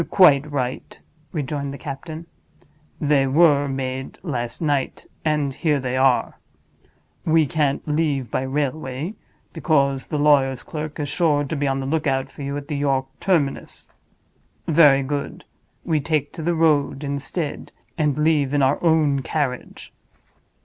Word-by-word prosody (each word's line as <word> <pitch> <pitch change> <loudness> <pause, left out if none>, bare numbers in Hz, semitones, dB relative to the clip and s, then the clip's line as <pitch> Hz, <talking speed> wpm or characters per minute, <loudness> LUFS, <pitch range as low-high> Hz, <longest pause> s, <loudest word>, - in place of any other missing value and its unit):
"Quite 150 -6 +5
right," 130 -2 -3 0.3
rejoined 145 -2 -3
the 140 - -7
captain. 155 +4 -7 0.7
"They 145 -2 +2
were 145 0 +4
made 130 -1 -4
last 120 -9 -3
night; 145 -4 -1 0.2
and 150 -3 0
here 150 -1 +1
they 130 -1 -3
are. 130 -1 +2 0.8
We 160 -1 +3
can't 145 0 -1
leave 150 -6 0
by - - 0
railway, 140 +4 -3 0.4
because 140 -4 +1
the 150 - -2
lawyer's 140 -3 +3
clerk 155 0 -6
is 145 - -2
sure 150 -1 +1
to 145 +3 -4
be 145 -1 -1
on 135 0 0
the - - -4
lookout 135 -2 -1
for - - -11
you 140 +1 -3
at 145 0 -7
the 150 -2 -3
York 135 -2 +1
terminus. 160 -8 -1 0.8
Very 150 -4 +5
good; 140 +1 -4 0.4
we 155 -2 +1
take 150 0 -1
to - - -7
the 170 +2 0
road 150 -3 +2
instead, 140 +2 -4 0.2
and 150 -4 0
leave 150 -3 +2
in 145 - +3
our 135 +5 +1
own 155 -4 +3
carriage. 135 -3 -4
145 Hz, 145 wpm, -22 LUFS, 135-155 Hz, 0.8 s, Quite